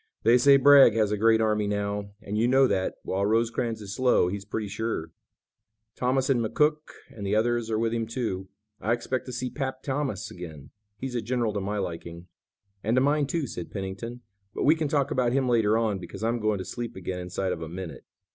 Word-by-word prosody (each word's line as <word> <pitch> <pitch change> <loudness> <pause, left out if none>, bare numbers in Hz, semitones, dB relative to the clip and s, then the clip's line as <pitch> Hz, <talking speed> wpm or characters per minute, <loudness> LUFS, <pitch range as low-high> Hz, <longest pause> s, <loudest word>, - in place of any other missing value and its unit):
"They 120 +3 +5
say 140 +2 +7
Bragg 140 -4 +7
has 110 -2 +2
a - - +2
great 110 +1 +4
army 105 -1 +1
now, 100 0 -2
and 105 - -4
you 115 +3 +2
know 135 +2 +5
that, 95 -5 0
while 95 +1 -1
Rosecrans 115 +1 0
is 100 -1 -6
slow 125 -7 +3
he's 100 +1 -5
pretty 105 +1 -3
sure. 105 -6 -3 0.8
Thomas 130 +1 +1
and 125 -4 +2
McCook 150 +7 +2 0.4
and 105 - -8
the 100 +1 0
others 120 +1 +1
are 110 - 0
with 115 +1 0
him, 115 -1 -1
too. 110 -6 -3 0.3
I 115 - +1
expect 125 +2 -3
to - - -5
see 125 +1 -3
'Pap' 130 -2 -4
Thomas 130 -7 -2
again. 80 -7 -9 0.3
He's 130 +4 -5
a 120 - -1
general 120 -1 -1
to 100 - -2
my 105 +2 -2
liking." 85 -2 -5 0.6
"And 110 +3 +1
to - - +5
mine, 145 +1 +2
too," 160 +1 -1
said 90 -8 -6
Pennington, 100 +5 -6 0.3
"but - - -1
we 150 - +6
can 160 -2 -1
talk 140 -1 0
about 125 -2 +1
him 135 -1 +1
later 110 -3 +3
on, 110 -4 0
because 90 - -8
I'm 115 +1 0
going 110 -1 +1
to 95 - -5
sleep 120 -1 -5
again 95 -1 -4
inside 90 +1 -3
of 80 - -4
a 80 - -5
minute." 90 -1 -7
110 Hz, 215 wpm, -27 LUFS, 100-125 Hz, 0.8 s, say